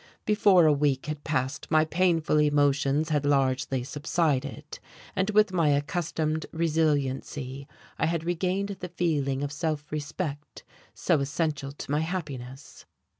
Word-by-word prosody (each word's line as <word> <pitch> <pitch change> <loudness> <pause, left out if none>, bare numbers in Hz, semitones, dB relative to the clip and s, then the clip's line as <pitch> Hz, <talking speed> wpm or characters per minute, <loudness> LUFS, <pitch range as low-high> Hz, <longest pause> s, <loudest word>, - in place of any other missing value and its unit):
Before 200 -5 +5
a 155 - +6
week 140 -2 +1
had 150 -1 -5
passed 145 -1 -2
my 155 0 +4
painful 165 -2 +2
emotions 145 0 +2
had 150 -2 +1
largely 135 -2 +1
subsided, 145 -1 -2 0.4
and 190 +2 +1
with 215 -2 +3
my 165 -4 +3
accustomed 155 +2 -1
resiliency 145 -4 -1 0.3
I - - +2
had 165 -1 -1
regained 185 +3 -1
the 180 - -6
feeling 145 -6 0
of 145 - -3
self 150 -1 -3
respect 150 0 -5 0.3
so - - +2
essential 145 -1 -2
to 140 - -8
my 150 - +2
happiness. 150 -6 -6
150 Hz, 130 wpm, -27 LUFS, 140-165 Hz, 0.4 s, a